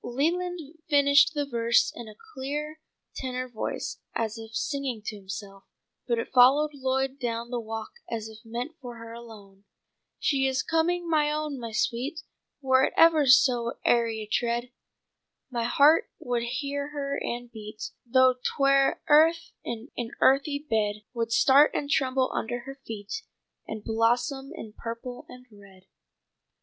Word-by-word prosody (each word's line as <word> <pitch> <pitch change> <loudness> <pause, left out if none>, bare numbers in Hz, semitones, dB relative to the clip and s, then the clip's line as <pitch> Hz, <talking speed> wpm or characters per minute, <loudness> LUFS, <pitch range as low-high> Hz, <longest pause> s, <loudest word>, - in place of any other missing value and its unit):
Leland 345 +8 -1 0.3
finished 285 +2 +5
the 290 -1 0
verse 235 -3 +2
in 235 - -8
a 215 - -11 0.2
clear 295 +3 -4 0.3
tenor 255 -1 -4
voice 235 -3 -4 0.2
as 225 -1 -1
if 225 -1 -9
singing 260 -2 -2
to 215 - -4
himself, 195 0 -8 0.4
but 235 -2 +1
it 230 - -4
followed 270 +4 +6
Lloyd 265 0 -1
down 235 -1 -3
the 245 - -1
walk 225 -1 -6 0.2
as 220 -2 -4
if 220 -1 -12
meant 240 +6 -5
for 245 -2 -8
her 230 0 -10
alone: 210 -4 -13 0.5
"'She 270 -2 +1
is 265 0 0
coming, 340 +2 0
my 305 -2 +2
own, 300 -2 -3
my 230 -1 -6
sweet! 255 +8 -2 0.4
Were 260 0 +4
it - - -3
ever 320 -3 +6
so 250 -2 +5
airy 230 -2 +2
a - - -5
tread 235 +3 -1 0.8
My 235 -2 -1
heart 290 +6 +4
would 245 -8 -2
hear 280 +4 -3
her 280 -1 -3
and 240 0 -4
beat 215 -1 -8
Though 255 +1 +4
'twere 275 -1 +2
earth 325 +2 +4
in 235 +3 -6
an 235 -1 -5
earthy 285 +2 +3
bed. 210 -2 0
Would 230 -1 -2
start 275 +5 +5
and 285 - -1
tremble 260 -1 +1
under 240 +2 -3
her 270 +3 -8
feet 220 - -5 0.5
And 220 -1 -6
blossom 240 +5 0
in 215 -1 -9
purple 235 +2 -7
and 250 0 -12
red.'" 195 -2 -17
250 Hz, 155 wpm, -27 LUFS, 230-280 Hz, 0.8 s, followed